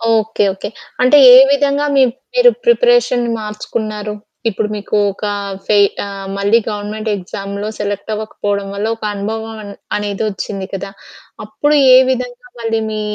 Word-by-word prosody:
Okay 220 Hz, -1 st, 0 dB
okay. 195 Hz, -, -6 dB, 0.3 s
అంటే 255 Hz, +4 st, +6 dB, 0.2 s
ఏ -, -, +10 dB
విధంగా 285 Hz, +1 st, +1 dB
మీ 270 Hz, -, +6 dB, 0.3 s
మీరు -, -, +7 dB, 0.2 s
ప్రిపరేషన్‌ని 475 Hz, -, +3 dB
మార్చుకున్నారు? 210 Hz, 0 st, -5 dB, 0.4 s
ఇప్పుడు 210 Hz, +1 st, -2 dB
మీకు 205 Hz, 0 st, -4 dB, 0.2 s
ఒక 210 Hz, -, -14 dB, 0.4 s
ఫే 210 Hz, -, +2 dB, 0.3 s
ఆహ్, 195 Hz, -1 st, -7 dB
మళ్ళీ 205 Hz, +4 st, +3 dB
గవర్నమెంట్ 215 Hz, +1 st, -4 dB
ఎగ్జామ్స్‌‌లో 200 Hz, +2 st, -6 dB
సెలెక్ట్ 205 Hz, +1 st, -4 dB
అవ్వకపోవడం 205 Hz, -2 st, -3 dB
వల్ల 205 Hz, +2 st, -2 dB
ఒక 225 Hz, -, -15 dB
అనుభవం 220 Hz, +2 st, -4 dB
అన్ 200 Hz, 0 st, -9 dB, 0.2 s
అనేదొచ్చింది 205 Hz, -1 st, -4 dB
కదా! 195 Hz, +1 st, -5 dB, 0.5 s
అప్పుడు 290 Hz, +8 st, 0 dB, 0.2 s
ఏ -, -, +9 dB
విధంగా 250 Hz, +5 st, -3 dB
మళ్ళీ 225 Hz, -1 st, -1 dB
మీ 215 Hz, 0 st, -3 dB
215 Hz, 135 wpm, -16 LUFS, 200-240 Hz, 0.5 s, ఏ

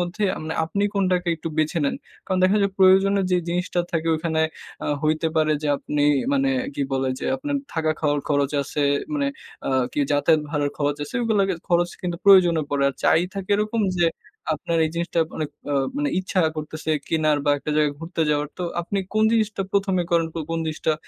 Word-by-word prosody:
মধ্যে 175 Hz, +4 st, -2 dB
আমনে 155 Hz, +1 st, -4 dB
আপনি 200 Hz, +5 st, -2 dB
কোনটাকে 180 Hz, -3 st, +1 dB
একটু 165 Hz, -, -5 dB
বেছে 155 Hz, +2 st, +1 dB
নেন। -, -, 0 dB, 0.3 s
কারণ 185 Hz, -1 st, 0 dB
দেখা 195 Hz, +3 st, +4 dB
যায় 200 Hz, -, +1 dB
প্রয়োজনের 195 Hz, +1 st, +5 dB
যে -, -, +5 dB
জিনিসটা 175 Hz, 0 st, -1 dB
থাকে, 165 Hz, 0 st, 0 dB
ওখানে 160 Hz, 0 st, -1 dB, 0.4 s
আ -, -, -2 dB, 0.2 s
হইতে 155 Hz, +1 st, +1 dB
পারে 155 Hz, -1 st, +3 dB
যে, 150 Hz, -, -1 dB
আপনি 145 Hz, +1 st, -2 dB, 0.3 s
মানে 275 Hz, -1 st, +2 dB, 0.3 s
কি -, -, -1 dB
বলে? 135 Hz, 0 st, 0 dB
যে, -, -, -6 dB
আপনার 285 Hz, +2 st, -3 dB, 0.2 s
থাকা 160 Hz, -1 st, 0 dB
খাওয়ার 145 Hz, -2 st, +1 dB
খরচ 145 Hz, -1 st, +1 dB
আছে, 145 Hz, +1 st, -3 dB, 0.3 s
মানে 285 Hz, -1 st, 0 dB, 0.4 s
আ -, -, 0 dB, 0.2 s
কি -, -, -4 dB
যাতায়াত 150 Hz, +2 st, +3 dB
ভাড়ার 145 Hz, -2 st, 0 dB
খরচ 145 Hz, 0 st, 0 dB
আছে, -, -, -12 dB
এগুলো 220 Hz, -3 st, +2 dB, 0.3 s
খরচ 175 Hz, 0 st, +2 dB
কিন্তু 175 Hz, -1 st, -2 dB
প্রয়োজনে 175 Hz, -5 st, +6 dB
পড়ে। 140 Hz, -1 st, 0 dB
আর 140 Hz, -, -4 dB
চাই 165 Hz, -, +5 dB
থাকে 195 Hz, -1 st, -6 dB
এরকম 215 Hz, +2 st, -1 dB, 0.2 s
যে, 175 Hz, -1 st, +3 dB, 0.5 s
আপনার 165 Hz, +2 st, -2 dB
এই 155 Hz, -, -1 dB
জিনিসটা 170 Hz, 0 st, -2 dB, 0.2 s
অনেক 155 Hz, -2 st, -3 dB, 0.2 s
আ -, -, +1 dB, 0.2 s
মানে 290 Hz, 0 st, 0 dB
ইচ্ছা 185 Hz, 0 st, 0 dB, 0.2 s
করতেছে 155 Hz, +1 st, -4 dB, 0.2 s
কেনার 155 Hz, -2 st, +2 dB
বা 145 Hz, -, +3 dB
একটা 150 Hz, -, -5 dB
জায়গায় 150 Hz, -2 st, +2 dB
ঘুরতে 165 Hz, 0 st, -3 dB
যাওয়ার। 145 Hz, 0 st, 0 dB
তো 180 Hz, -, -3 dB, 0.2 s
আপনি 195 Hz, +3 st, -3 dB, 0.2 s
কোন 215 Hz, 0 st, +4 dB
জিনিসটা 215 Hz, -3 st, +1 dB
১ম 195 Hz, -1 st, +1 dB
এ -, -, -5 dB
করেন, 165 Hz, -1 st, +3 dB
কো -, -, -3 dB
কোন 165 Hz, -, -1 dB
জিনিসটা 155 Hz, 0 st, -1 dB
170 Hz, 200 wpm, -23 LUFS, 155-190 Hz, 0.5 s, প্রয়োজনে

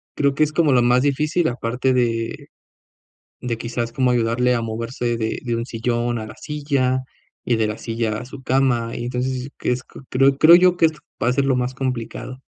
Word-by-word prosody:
creo 140 Hz, -1 st, +2 dB
que 155 Hz, -, +3 dB
es 155 Hz, -, 0 dB
como 155 Hz, -2 st, +3 dB
lo 125 Hz, -2 st, +4 dB
más 125 Hz, +1 st, +4 dB
difícil, 150 Hz, +4 st, +1 dB
aparte 125 Hz, +2 st, -1 dB
de 115 Hz, -2 st, -1 dB, 0.9 s
de 120 Hz, -2 st, -3 dB
quizás 115 Hz, 0 st, -3 dB
como 130 Hz, 0 st, +1 dB
ayudarle 120 Hz, +1 st, +2 dB
a 120 Hz, -, -1 dB
moverse 115 Hz, +1 st, -3 dB
de 110 Hz, -1 st, -2 dB
de 120 Hz, -2 st, -1 dB
un 115 Hz, +1 st, -3 dB
sillón 120 Hz, 0 st, -1 dB
a 110 Hz, -, -6 dB
la 110 Hz, -, -10 dB
silla 140 Hz, -4 st, 0 dB, 0.4 s
y 120 Hz, -, +1 dB
de 110 Hz, -1 st, +1 dB
la 105 Hz, 0 st, -3 dB
silla 115 Hz, -2 st, -2 dB
a 120 Hz, -, -6 dB
su 135 Hz, +2 st, -11 dB
cama, 125 Hz, -3 st, +1 dB
y 120 Hz, -, -4 dB
entonces, 125 Hz, +2 st, -3 dB
que -, -, -1 dB
es 125 Hz, +1 st, -2 dB
q -, -, -13 dB
creo 135 Hz, +1 st, +3 dB
creo 165 Hz, +3 st, +8 dB
yo 180 Hz, 0 st, +4 dB
que 165 Hz, -, +6 dB
est 160 Hz, -, -2 dB, 0.3 s
va 120 Hz, -, +2 dB
a -, -, +3 dB
ser 140 Hz, +1 st, +1 dB
lo 135 Hz, -2 st, +2 dB
más 125 Hz, +1 st, -1 dB
complicado. 130 Hz, -1 st, -4 dB
125 Hz, 215 wpm, -21 LUFS, 115-135 Hz, 0.9 s, creo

